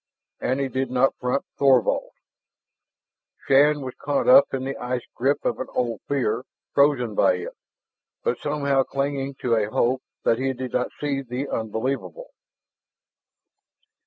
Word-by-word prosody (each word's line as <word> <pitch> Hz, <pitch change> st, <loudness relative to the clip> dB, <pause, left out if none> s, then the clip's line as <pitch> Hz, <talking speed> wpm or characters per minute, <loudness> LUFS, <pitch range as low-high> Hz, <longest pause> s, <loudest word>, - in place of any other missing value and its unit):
And 130 Hz, +2 st, -1 dB
he 135 Hz, -, 0 dB
did 130 Hz, -1 st, -2 dB
not 130 Hz, +1 st, +2 dB
front 125 Hz, +2 st, -1 dB
Thorvald. 135 Hz, -4 st, +3 dB, 1.4 s
Shann 145 Hz, +2 st, +4 dB
was 130 Hz, -2 st, -5 dB
caught 145 Hz, -1 st, 0 dB
up 130 Hz, +2 st, +7 dB
in 135 Hz, -1 st, -2 dB
the 135 Hz, +1 st, -3 dB
ice 125 Hz, 0 st, -3 dB
grip 135 Hz, +4 st, 0 dB
of -, -, 0 dB
an 130 Hz, -, -3 dB
old 120 Hz, -3 st, -1 dB
fear, 125 Hz, -4 st, 0 dB, 0.3 s
frozen 140 Hz, -5 st, +3 dB
by 95 Hz, -, +3 dB
it, 90 Hz, -, -7 dB, 0.7 s
but -, -, 0 dB
somehow 140 Hz, -2 st, +1 dB
clinging 140 Hz, 0 st, -2 dB
to 120 Hz, -, +1 dB
a 110 Hz, -2 st, +1 dB
hope 125 Hz, +4 st, +1 dB, 0.2 s
that 115 Hz, -, +2 dB
he 135 Hz, 0 st, 0 dB
did 130 Hz, -1 st, -6 dB
not 125 Hz, -, 0 dB
see 140 Hz, -2 st, -1 dB
the 130 Hz, +2 st, -4 dB
unbelievable. 130 Hz, -, -3 dB
130 Hz, 145 wpm, -24 LUFS, 125-140 Hz, 1.4 s, up